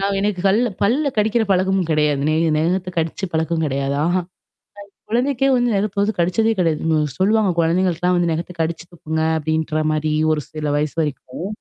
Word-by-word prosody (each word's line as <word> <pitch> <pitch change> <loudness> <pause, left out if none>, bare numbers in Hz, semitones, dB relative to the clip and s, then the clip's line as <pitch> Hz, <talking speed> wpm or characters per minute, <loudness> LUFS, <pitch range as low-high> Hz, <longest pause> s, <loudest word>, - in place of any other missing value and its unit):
நான் 195 0 0
எனக்கு 205 -2 -1
கல்ல 225 +5 +3
பல்ல 255 +9 +2
கடிக்கிற 220 +2 +2
பழக்கமும் 185 -1 +1
கிடையாது. 150 -2 +2
நெ 155 - +2 0.2
நகத்த 180 +3 0
கடிச்ச 165 +4 -2
பழக்கம் 160 0 0
கிடையாது. 140 0 -1
அஹ 175 +2 +1
என் 175 - -9 0.8
குழந்தைக்கே 265 +3 +1
வந்து 245 -2 +1
நெகத்து 200 0 -1
வது 205 +2 +1
கடிச்சதே 200 +6 +2
கிடையாது. 165 -3 0 0.4
சொல்லுவாங்க. 210 +1 +3
கொழந்தைங்களுக்குலாம் 180 +1 +1
வந்து 170 -1 +1
நகத்து 170 +3 -4
கடிச்சு 165 +1 -3
துப்புங்க. 160 -1 -4 0.2
அப்படின்ற 155 0 -1
மாரி 155 0 -1 0.2
ஒரு 155 - 0
சில 155 -1 -5
வயசு 150 0 -1
வரைக்கும். 150 +2 -5
175 Hz, 165 wpm, -20 LUFS, 155-200 Hz, 0.8 s, கல்ல